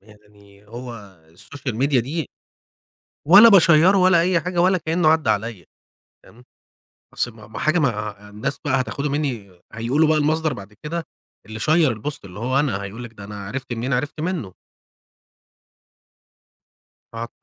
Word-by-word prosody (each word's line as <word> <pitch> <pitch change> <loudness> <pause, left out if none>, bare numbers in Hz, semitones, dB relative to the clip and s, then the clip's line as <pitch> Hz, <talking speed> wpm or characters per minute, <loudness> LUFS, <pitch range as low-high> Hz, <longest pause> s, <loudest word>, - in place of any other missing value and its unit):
يعني 105 -1 -21
هو 120 +2 -8 0.3
السوشيال 130 - -7
ميديا 135 +1 +2
ده 150 +7 -4 1.0
ولا 200 +8 +9
بِاشيّره 180 -1 +6
ولا 185 -2 +5
أي 175 0 +2
حاجة، 175 +1 -2
ولا 185 0 +3
كأنه 160 +1 +1
عدَّى 160 -1 +3
عليَّا، 105 -4 -3 0.6
تمام، 120 +2 -18 0.7
أصل 120 - -1
ما 110 -1 -14
ما 110 - -9
حاجة، 155 +3 +1
ما 105 -6 -2
الناس 130 +7 -4
بقى 135 -3 +1
هتاخده 140 +3 -3
مني 115 -12 -4
هيقولوا 130 +8 +1
بقى 155 0 +3
المصدر 155 +1 +1
بعد 100 -1 -10
كده 165 +2 -3 0.4
اللي 110 0 -8
شيّر 155 +3 +3
البوست، 125 +3 -6
اللي 95 0 -11
هو 130 +5 +1
أنا 125 -10 -1
هيقول 105 +5 -7
لِك 115 - -10
ده 100 -2 -12
أنا 100 -1 -8
عرفت 130 +3 -6
منين؟ 120 +3 -3
عرفت 145 +5 -2
منه. 155 - -3 2.6
آه، 115 +1 -5
130 Hz, 150 wpm, -21 LUFS, 105-155 Hz, 2.6 s, ولا